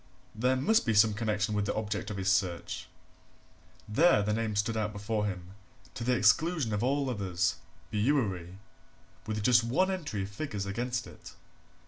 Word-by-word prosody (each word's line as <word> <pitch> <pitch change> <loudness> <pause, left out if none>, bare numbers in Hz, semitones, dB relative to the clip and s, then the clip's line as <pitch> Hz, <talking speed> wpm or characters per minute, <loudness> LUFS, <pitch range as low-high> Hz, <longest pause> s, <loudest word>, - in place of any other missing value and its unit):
there 125 +4 +1
must 190 - +3
be 115 -3 0
some 105 +1 +5
connection 105 -1 -1
with 105 0 0
the - - -1
object 105 -2 -3
of 105 - -5
his 95 -1 -3
search. 90 -2 -1 1.0
There 110 0 +4
the 105 +1 0
name 110 -1 -1
stood 110 +3 0
out 105 -1 -1
before 105 +1 -2
him, 90 -2 -6 0.4
to 120 - -5
the 125 +1 +2
exclusion 145 - +3
of 105 - -1
all 140 +2 +1
others 95 -7 -1 0.3
Bewery 105 -7 0 0.7
with 105 -1 -2
just 120 +1 +5
one 180 +12 +1
entry 145 - -3
of 95 - -6
figures 100 -3 -4
against 120 +4 -2
it. - - -13
110 Hz, 165 wpm, -30 LUFS, 100-125 Hz, 1.0 s, some